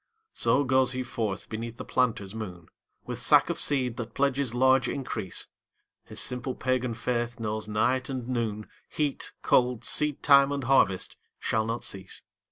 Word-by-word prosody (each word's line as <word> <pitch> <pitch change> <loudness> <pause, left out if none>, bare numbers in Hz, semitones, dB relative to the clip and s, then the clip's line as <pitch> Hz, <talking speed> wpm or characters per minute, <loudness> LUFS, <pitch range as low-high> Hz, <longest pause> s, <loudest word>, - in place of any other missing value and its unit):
So 125 +5 +2
goes 130 -1 +2
he 130 0 -2
forth 110 -5 -3
beneath 115 +1 -5
the - - -7
planter's 110 -6 0
moon 90 -7 -7 0.4
With - - -4
sack - - +5
of - - -4
seed 130 -5 +1
that 115 -1 -6
pledges 140 -3 +1
large 130 0 +4
increase, 110 -8 -3 0.6
His - - -5
simple 125 +1 -1
pagan 125 -2 -1
faith 120 0 -2
knows 110 -1 -3
night 125 +5 +1
and 130 -3 -4
noon, 110 -4 -2 0.2
Heat, 150 -2 -2
cold, 125 -2 +2
seedtime 140 -1 +4
and 140 -1 -2
harvest 120 -7 +2 0.2
shall 110 0 0
not 115 +1 -3
cease. 95 -1 -4
125 Hz, 155 wpm, -28 LUFS, 110-130 Hz, 0.6 s, sack